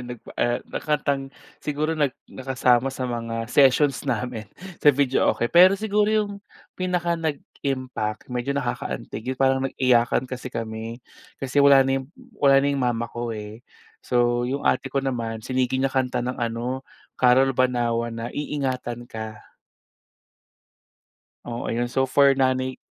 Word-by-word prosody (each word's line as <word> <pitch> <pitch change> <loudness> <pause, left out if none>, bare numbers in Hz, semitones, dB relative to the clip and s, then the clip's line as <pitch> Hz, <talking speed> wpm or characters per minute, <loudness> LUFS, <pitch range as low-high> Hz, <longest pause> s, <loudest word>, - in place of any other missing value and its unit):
nagpa 125 -2 -9
eh, 120 0 +2 0.2
kantang 140 -3 -1 0.3
siguro 150 +2 -1
nag 150 -3 +2 0.2
nakasama 130 -1 +2
sa 130 -1 -4
mga 115 -2 -3
sessions 140 0 +4
namin 120 -3 -3 0.3
sa - - +5
videoke. 135 -4 +2
Pero 185 +3 +7
siguro 210 0 +1
'yong 210 -2 0 0.3
pinaka-nag-impact 150 -10 -3
medyo 125 +3 -2
nakaka-antig 130 -3 -4
'yon 130 - -2
parang 130 0 +3
nag-iyakan 125 -1 +2
kasi 130 0 -6
kami, 115 +1 -6 0.3
kasi 135 +1 0
wala 140 -1 +7
na 135 0 +1
'yong 130 - -12 0.3
wala 135 -1 +6
na - - +2
'yong 140 - -1
mama 120 -2 0
ko, 120 0 -4
eh. 105 +1 -8 0.4
So 120 0 +1
yung 140 +2 -3
ate - - +2
ko 140 - -1
naman, 115 -4 -3
sinigi 130 0 0
niya 135 0 0
kanta 125 -2 0
ng 125 0 -4
ano, 120 +3 -2 0.3
Carol 130 +2 +4
Banawa 120 -2 +1
na 115 +1 -6
Iingatan 130 -5 -3
Ka. 110 -2 -9 1.9
Oo 120 0 -4
'yon 120 +1 -1
so 135 +1 +1
for 140 +1 +4
nanay 130 0 +1
130 Hz, 140 wpm, -24 LUFS, 120-140 Hz, 1.9 s, Pero